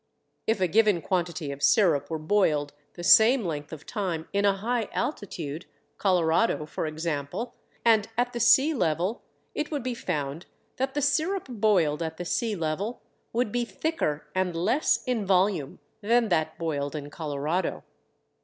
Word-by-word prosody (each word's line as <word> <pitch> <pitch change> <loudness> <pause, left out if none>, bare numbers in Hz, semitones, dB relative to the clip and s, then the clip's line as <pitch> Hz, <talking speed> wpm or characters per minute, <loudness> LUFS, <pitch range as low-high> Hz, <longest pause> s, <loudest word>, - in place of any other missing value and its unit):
If 225 -2 +2
a 185 - +2
given 210 0 +3
quantity 175 -5 -1
of 140 0 -8
sirup 155 -1 +3
were 160 - -2
boiled 155 -4 +1 0.2
the 175 - -7
same 220 +6 +6
length 150 -3 -4
of 160 -2 -9
time 175 -6 -3
in 200 0 +2
a 200 -1 +3
high 230 +2 -1
altitude, 170 - -4 0.3
Colorado 180 -1 +2
for 155 - -4
example, 155 - -3 0.3
and 220 -3 +4
at 245 0 +1
the 240 - -3
sea 265 +7 +5
level, 180 - 0 0.3
it 300 - -2
would 290 -5 -3
be 255 0 -2
found 150 -7 -4 0.3
that 265 +1 -2
the 290 - 0
sirup 330 +7 +1
boiled 200 - +2
at 160 -1 -3
the 175 - -5
sea 220 +4 -1
level 175 +7 -3 0.3
would 235 -2 0
be 245 +1 0
thicker 235 - -2
and 185 -2 0
less 220 - +1
in 245 -4 0
volume 185 -6 +1 0.2
than 230 +2 +2
that 160 -3 0
boiled 145 -3 -2
in 145 -1 -6
Colorado. 150 +3 -2
185 Hz, 160 wpm, -27 LUFS, 155-230 Hz, 0.3 s, same